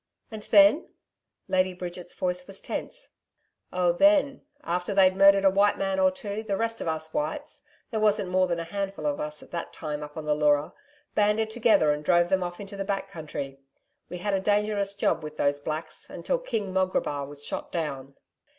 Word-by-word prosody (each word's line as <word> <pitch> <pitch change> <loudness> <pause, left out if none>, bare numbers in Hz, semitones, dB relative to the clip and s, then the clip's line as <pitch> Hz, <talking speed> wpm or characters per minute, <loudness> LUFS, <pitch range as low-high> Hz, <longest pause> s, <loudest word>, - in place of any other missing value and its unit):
'And 220 -1 -7
then?' 210 +10 +6 0.6
Lady 185 0 +1
Bridget's 175 0 -7
voice 180 0 -2
was 195 -1 -4
tense. - - -4 0.6
'Oh 180 -1 +2
then 285 - +3 0.2
after 180 +3 -2
they'd 190 -1 +5
murdered 195 0 +6
a 195 - +6
white 200 +2 +3
man 195 -1 -1
or 190 0 +5
two, 200 +3 -5
the 205 -3 -2
rest 225 +1 -2
of - - -4
us 160 0 -2
whites 150 +1 -3 0.3
there 220 - -1
wasn't 210 -3 +2
more 185 0 +3
than 170 -1 -1
a - - -2
handful 195 -1 -4
of 145 -1 0
us 150 0 -5
at - - -17
that 170 -1 -5
time 150 -2 -5
up 150 +1 -9
on 155 - -5
the 150 - +2
Leura 150 0 +2 0.4
banded 210 +1 +2
together 220 -10 +4
and 150 0 -2
drove 175 +1 +3
them 190 -1 +2
off 175 0 -4
into 200 0 -8
the 195 - -3
back 195 0 -3
country. 145 -5 -6 0.5
We 180 - -5
had 205 +3 -2
a 195 - +2
dangerous 205 0 0
job 200 - +1
with 155 0 -8
those 145 0 +1
Blacks 155 +2 -5
until - - -2
King 220 - -3
Mograbar 185 -7 0
was 145 0 -6
shot - - -5
down.' 140 -5 -4
185 Hz, 195 wpm, -27 LUFS, 155-200 Hz, 0.6 s, then